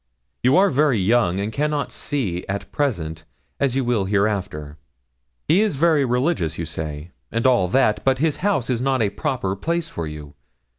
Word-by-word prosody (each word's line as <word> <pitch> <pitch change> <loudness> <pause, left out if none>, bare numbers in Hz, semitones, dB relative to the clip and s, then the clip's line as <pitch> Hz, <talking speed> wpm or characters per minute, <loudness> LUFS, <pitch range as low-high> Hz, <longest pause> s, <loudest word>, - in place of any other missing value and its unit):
'You 130 +6 +4
are 195 +1 +5
very 140 -3 +3
young, 100 -2 +2
and 105 +2 -3
cannot 150 0 -1
see 115 -12 -2
it 90 - -7
at 100 +1 -4
present, 80 - -2 0.4
as 135 -3 +1
you 135 -2 0
will 115 -5 +1
hereafter. 95 -7 -1 0.7
He 175 +6 +4
is 215 -7 +1
very 155 -1 +3
religious, 125 - 0
you - - -3
say, 75 +1 -6 0.2
and 115 +2 -1
all 120 -8 +4
that, 110 +1 +2
but 135 0 +3
his 150 +2 0
house 190 - 0
is 120 -1 -1
not 130 -2 +1
a 100 - 0
proper 105 -3 -2
place 170 - -2
for 85 - -5
you. 75 -1 -9
120 Hz, 185 wpm, -22 LUFS, 95-145 Hz, 0.7 s, are